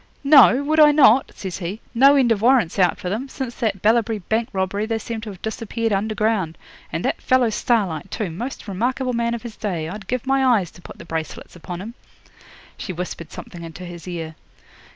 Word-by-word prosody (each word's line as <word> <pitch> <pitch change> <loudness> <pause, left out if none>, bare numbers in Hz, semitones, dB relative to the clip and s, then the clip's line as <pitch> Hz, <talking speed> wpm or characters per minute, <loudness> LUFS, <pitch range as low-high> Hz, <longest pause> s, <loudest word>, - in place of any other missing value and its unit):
'"Know? 275 -2 +7
Would 310 +2 +1
I 300 -1 +8
not?" 270 -4 +5
says 190 -2 -6
he. 190 +4 -5
"No 275 +4 +6
end 255 -4 +3
of 210 -3 +1
warrants 235 -7 +3
out 180 -1 +3
for - - -6
them; 225 +9 -3
since 260 -3 -5
that 200 -5 -2
Ballabri 225 0 +3
Bank 220 +5 -2
robbery 195 +2 -1
they 225 0 -1
seem 225 0 -5
to 220 - -7
have 190 -3 -11
disappeared 225 0 -2
under 215 +2 -1
ground. 210 -7 0 0.3
And - - -3
that - - -1
fellow 255 -3 +3
Starlight, 195 -7 0
too! 195 -4 -3
Most 235 +9 -6
remarkable 250 +6 -1
man 235 0 0
of 235 - -8
his 235 -3 -8
day. 175 -7 -3
I'd 190 +2 -8
give 250 0 -2
my 270 0 +2
eyes 220 -10 +2
to - - -16
put - - -12
the - - -11
bracelets 160 0 -6
upon 175 +1 -7
him." 225 +4 -7 0.9
'She 185 - -5
whispered 175 -1 -6
something 185 -8 -9
into 165 +2 -8
his 175 0 -10
ear. 165 -3 -5
220 Hz, 210 wpm, -22 LUFS, 180-240 Hz, 0.9 s, I